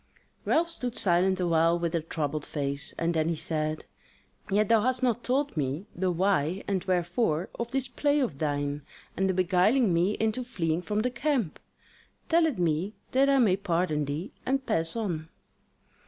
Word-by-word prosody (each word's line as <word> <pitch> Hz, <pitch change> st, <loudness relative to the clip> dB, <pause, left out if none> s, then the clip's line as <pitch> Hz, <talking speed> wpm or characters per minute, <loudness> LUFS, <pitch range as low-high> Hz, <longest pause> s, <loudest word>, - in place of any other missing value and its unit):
Ralph 335 Hz, +2 st, +3 dB
stood 250 Hz, -7 st, -4 dB
silent 185 Hz, +1 st, +2 dB
awhile 170 Hz, -1 st, +3 dB
with 170 Hz, -1 st, -2 dB
a 170 Hz, -, +1 dB
troubled 155 Hz, -2 st, -3 dB
face; 140 Hz, -1 st, -2 dB
and 170 Hz, +1 st, 0 dB
then 160 Hz, 0 st, +1 dB
he 170 Hz, -, 0 dB
said: 155 Hz, 0 st, -2 dB, 0.6 s
"Yet 205 Hz, +1 st, +2 dB
thou 225 Hz, -2 st, +4 dB
hast 255 Hz, +2 st, 0 dB
not 240 Hz, -1 st, +1 dB
told 275 Hz, +1 st, 0 dB
me 145 Hz, +4 st, -2 dB
the 185 Hz, +1 st, -1 dB
why 180 Hz, -1 st, +1 dB
and 190 Hz, -3 st, 0 dB
wherefore 180 Hz, -1 st, 0 dB
of 235 Hz, 0 st, -2 dB
this 265 Hz, 0 st, -1 dB
play 285 Hz, +4 st, +1 dB
of 190 Hz, -, -1 dB
thine, 145 Hz, -1 st, -1 dB, 0.3 s
and 190 Hz, 0 st, +1 dB
the -, -, +2 dB
beguiling 185 Hz, +5 st, +3 dB
me 175 Hz, +5 st, +2 dB
into 220 Hz, +4 st, -1 dB
fleeing 170 Hz, -9 st, -1 dB
from 210 Hz, +3 st, -1 dB
the 250 Hz, +2 st, 0 dB
camp. 250 Hz, -, -1 dB, 0.7 s
Tell 330 Hz, 0 st, +4 dB
it 295 Hz, -, -2 dB
me 175 Hz, +4 st, 0 dB, 0.2 s
that 270 Hz, +2 st, +4 dB
I 275 Hz, -, +4 dB
may 210 Hz, -8 st, +4 dB
pardon 170 Hz, -6 st, 0 dB
thee 150 Hz, +8 st, -4 dB
and 270 Hz, 0 st, -1 dB
pass 165 Hz, -6 st, 0 dB
on." 170 Hz, -8 st, -3 dB
185 Hz, 175 wpm, -28 LUFS, 160-235 Hz, 0.7 s, thou